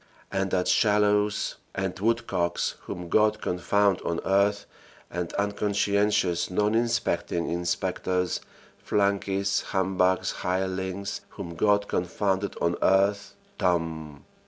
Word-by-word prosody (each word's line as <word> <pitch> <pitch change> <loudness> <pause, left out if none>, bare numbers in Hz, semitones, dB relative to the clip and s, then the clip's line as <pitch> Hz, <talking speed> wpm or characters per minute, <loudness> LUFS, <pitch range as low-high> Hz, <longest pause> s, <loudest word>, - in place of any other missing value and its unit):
and 95 0 0
that 90 -1 0
Shallows 105 -1 +2 0.2
and 95 -1 -1
Woodcocks, 100 -6 0
whom 90 -1 -6
God 110 +4 +3
confound 100 +1 +1
on 85 0 -2
earth, 100 +1 +2 0.5
and 90 -1 -3
unconscientious 100 -2 +1
non 105 +3 +1
inspecting 115 -7 0
inspectors, 90 +1 -1 0.4
flunkeys, 100 -1 +1
humbugs, 95 -1 +1
hirelings, 95 +1 -2 0.2
whom 85 -5 -6
God 100 +3 +2
confound 95 +2 -1
on 85 0 +1
earth 100 +1 +2 0.2
("TOMB!") 80 -4 -1
95 Hz, 100 wpm, -26 LUFS, 90-105 Hz, 0.5 s, God